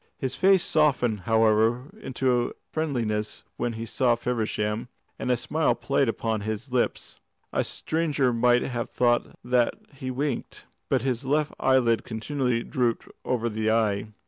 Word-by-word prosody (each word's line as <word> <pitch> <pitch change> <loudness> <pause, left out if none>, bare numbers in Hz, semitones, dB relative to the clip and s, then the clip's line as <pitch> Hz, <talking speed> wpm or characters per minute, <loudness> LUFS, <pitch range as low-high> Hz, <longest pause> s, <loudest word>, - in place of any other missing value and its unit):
His 130 -1 -3
face 190 -1 +4
softened, 130 -8 +2
however, 115 - +3
into 125 -2 0 0.2
friendliness 115 -9 -2
when 120 -1 -1
he 115 +1 -5
saw 120 +1 +2
Feversham, 110 -2 -2 0.3
and - - -3
a 125 - +3
smile 155 +6 +1
played 140 -2 +1
upon 110 -1 -1
his 110 +5 -4
lips. 125 -1 -1 0.3
A - - +2
stranger 150 -6 0
might 120 +1 +3
have 120 -2 -3
thought 120 -1 +1
that 125 -1 +2 0.2
he 130 -1 -6
winked. 140 +3 -3 0.2
But 130 -3 +2
his 130 -1 -1
left 150 +3 0
eyelid 125 -4 +3
continually 125 +1 -1
drooped 120 -3 -1
over 120 -2 0
the 110 -1 -1
eye. 110 -2 +1
120 Hz, 145 wpm, -26 LUFS, 115-135 Hz, 0.3 s, face